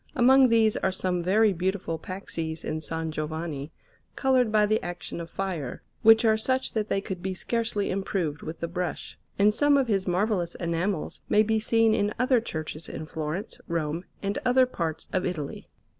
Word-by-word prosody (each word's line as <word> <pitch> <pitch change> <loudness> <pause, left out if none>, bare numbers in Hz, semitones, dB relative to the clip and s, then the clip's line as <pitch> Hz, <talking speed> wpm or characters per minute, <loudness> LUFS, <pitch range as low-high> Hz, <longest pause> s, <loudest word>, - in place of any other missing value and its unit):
Among 260 0 +6
these 225 -2 +4
are 190 - +1
some 185 -1 -1
very 205 +4 +3
beautiful 180 -2 -2
paxes 165 -3 -5
in 155 - -2
S. 155 - -4 0.2
Giovanni, 155 -1 -4 0.4
coloured 255 -4 +2
by 215 -1 +4
the 215 +1 +1
action 175 -1 -5
of 165 - -8
fire, 170 -9 -4 0.2
which 225 +1 +7
are 220 -1 +4
such 260 +4 0
that 215 -1 -1
they 195 - +1
could 190 -3 -5
be 190 0 -3
scarcely 225 0 -1
improved 185 -6 -2
with 160 +1 -7
the 170 - -1
brush; 180 +1 -4 0.2
and 205 +1 +4
some 290 +4 +4
of 270 -2 +2
his 195 -3 +1
marvellous 180 -1 0
enamels 170 +1 -2
may 210 - +5
be 220 0 +1
seen 225 0 +3
in 205 -1 0
other 250 -1 +3
churches 155 -6 -6
in 155 - -6
Florence, 160 +5 -5
Rome, 165 +1 -2 0.2
and 200 +1 -1
other 255 +1 +5
parts 165 -10 -4
of 185 - +1
Italy. 160 -7 -4
190 Hz, 180 wpm, -27 LUFS, 170-220 Hz, 0.4 s, which